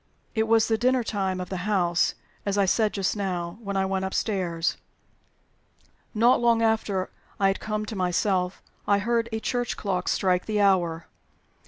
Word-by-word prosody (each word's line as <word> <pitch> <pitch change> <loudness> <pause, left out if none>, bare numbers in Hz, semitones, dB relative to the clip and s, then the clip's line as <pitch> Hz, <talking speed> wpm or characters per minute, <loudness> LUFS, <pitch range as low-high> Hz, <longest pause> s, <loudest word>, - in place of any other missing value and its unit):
"It 220 -1 +1
was 225 0 +4
the 225 -1 +1
dinner 255 0 +2
time 190 -4 -2
of 180 - -5
the 190 +2 -4
house 175 -4 +2 0.3
(as 200 0 -1
I 200 - +4
said 215 +3 +2
just 195 0 -1
now) 180 -2 -3
when 200 -2 -3
I 190 - +2
went 190 0 -1
upstairs. 185 -4 -1 1.4
Not 235 +3 +4
long 235 -1 +3
after 220 -4 0 0.3
I 195 -1 +4
had 195 - -1
come 215 0 -3
to 215 - -6
myself 180 0 0 0.2
I 200 - +4
heard 230 +3 0
a 220 - -2
church 245 +2 -2
clock 185 -3 -2
strike 180 -2 +1
the 215 -1 0
hour. 175 -5 +2
200 Hz, 170 wpm, -26 LUFS, 185-220 Hz, 1.4 s, was